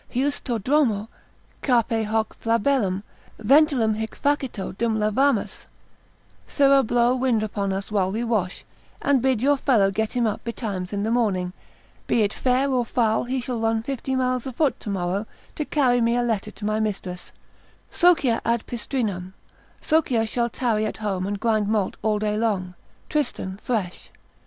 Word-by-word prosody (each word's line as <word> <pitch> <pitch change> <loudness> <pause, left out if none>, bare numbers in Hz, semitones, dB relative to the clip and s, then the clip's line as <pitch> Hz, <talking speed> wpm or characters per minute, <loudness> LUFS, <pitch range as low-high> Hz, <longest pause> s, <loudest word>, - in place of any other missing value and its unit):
—Heus 275 +3 0
tu 240 -4 -1
Dromo, 225 -3 +1 0.5
cape 230 -3 +2
hoc 220 0 0
flabellum, 225 -4 +1 0.3
ventulum 265 -1 +4
hinc 220 0 -5
facito 270 -10 -1
dum 225 +1 0
lavamus, 215 +3 0 0.8
sirrah 275 -1 +4
blow 240 0 +2
wind 250 -4 +1
upon 200 -2 -2
us 195 +2 -4
while 190 -3 +1
we 225 +4 -2
wash, 215 -6 -1 0.4
and 280 -3 +3
bid 255 -3 +1
your 285 +1 +4
fellow 220 -8 +3
get 220 +2 -2
him 245 -2 +1
up 215 - -2
betimes 205 -6 -4
in 200 -1 -2
the 220 - 0
morning, 190 -7 0 0.5
be 230 - +3
it 205 - 0
fair 255 +2 +1
or 250 -2 +2
foul, 225 -1 +1
he 260 +2 -1
shall 245 -1 -3
run 225 0 0
fifty 265 +1 -3
miles 255 0 0
afoot 265 +2 0
tomorrow, 195 0 -2 0.3
to 300 - -3
carry 250 -5 +2
me 235 +1 +2
a 245 - +1
letter 220 -3 -1
to 210 - -9
my 215 +1 0
mistress, 190 -4 -4 0.6
Socia 315 -10 +3
ad 235 -1 0
pistrinam, 210 -6 -3 0.5
Socia 255 -8 +2
shall 235 +1 0
tarry 220 -3 0
at - - -5
home 195 -3 -2
and 205 0 -3
grind 215 -2 +1
malt 210 -3 0
all 215 -1 +1
day 210 0 -1
long, 200 -5 -1 0.3
Tristan 250 -10 -2
thresh. 205 -5 -3
225 Hz, 160 wpm, -24 LUFS, 210-255 Hz, 0.8 s, ventulum